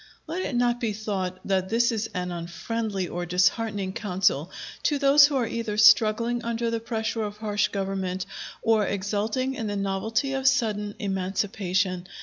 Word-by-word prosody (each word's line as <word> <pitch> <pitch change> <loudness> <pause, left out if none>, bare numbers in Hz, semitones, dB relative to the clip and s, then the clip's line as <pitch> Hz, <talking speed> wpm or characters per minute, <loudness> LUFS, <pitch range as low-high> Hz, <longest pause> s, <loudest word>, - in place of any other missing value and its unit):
Let 335 +4 -3
it 275 - -3
not 240 0 +2
be 225 -3 0
thought 195 -3 -3
that 190 -1 0
this 235 +2 +3
is 225 -1 -2
an 180 0 -2
unfriendly 190 +4 -3
or 175 0 -4
disheartening 190 +2 +1
counsel 180 -6 0 0.3
to 295 - +1
those 280 +1 +7
who 290 - -3
are 255 -3 +2
either 225 -2 -3
struggling 220 +3 +5
under 235 0 -1
the 230 - -1
pressure 225 0 -2
of 210 -1 -4
harsh 210 -1 0
government, 190 -1 -3 0.4
or 225 -2 +3
exulting 210 +6 -1
in 225 -4 -4
the 205 - -2
novelty 220 +7 -1
of 270 0 0
sudden 215 -6 +1
emancipation. 190 -1 -1
210 Hz, 160 wpm, -26 LUFS, 190-230 Hz, 0.4 s, those